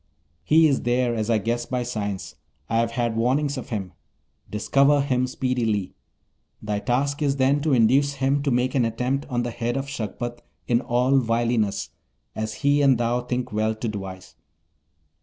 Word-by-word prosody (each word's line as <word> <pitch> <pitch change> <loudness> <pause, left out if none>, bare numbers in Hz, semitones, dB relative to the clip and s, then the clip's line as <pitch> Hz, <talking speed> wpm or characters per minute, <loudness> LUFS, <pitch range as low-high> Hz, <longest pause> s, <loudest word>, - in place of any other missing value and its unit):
He 160 +1 +5
is 140 - +1
there, 120 0 +1
as 110 -1 -2
I 115 - +4
guess 120 +3 -2
by 125 -1 -1
signs; 100 -7 -4 0.3
I 115 - 0
have 115 0 +2
had 115 -1 -1
warnings 135 +5 +1
of 130 - -7
him. 95 -5 -4 0.6
Discover 140 +7 +3
him 130 -2 0
speedily. 120 -7 -1 0.7
Thy 105 -1 -2
task 140 +6 -1
is 140 -2 +1
then 140 +2 +2
to 155 -1 +1
induce 130 +4 +4
him 135 +1 +1
to 140 - 0
make 125 0 +1
an 130 - +2
attempt 125 +5 -1
on 120 -2 0
the 120 - -3
head 120 +2 -2
of 135 - -2
Shagpat 120 -2 -5 0.3
in 120 0 +2
all 125 +2 +2
wiliness, 115 -3 0 0.5
as 110 0 -3
he 145 +1 +4
and 135 -3 +5
thou 120 +1 0
think 125 -1 -3
well 110 +1 0
to 115 +2 -4
devise. 95 -4 -7
120 Hz, 175 wpm, -24 LUFS, 115-135 Hz, 0.7 s, He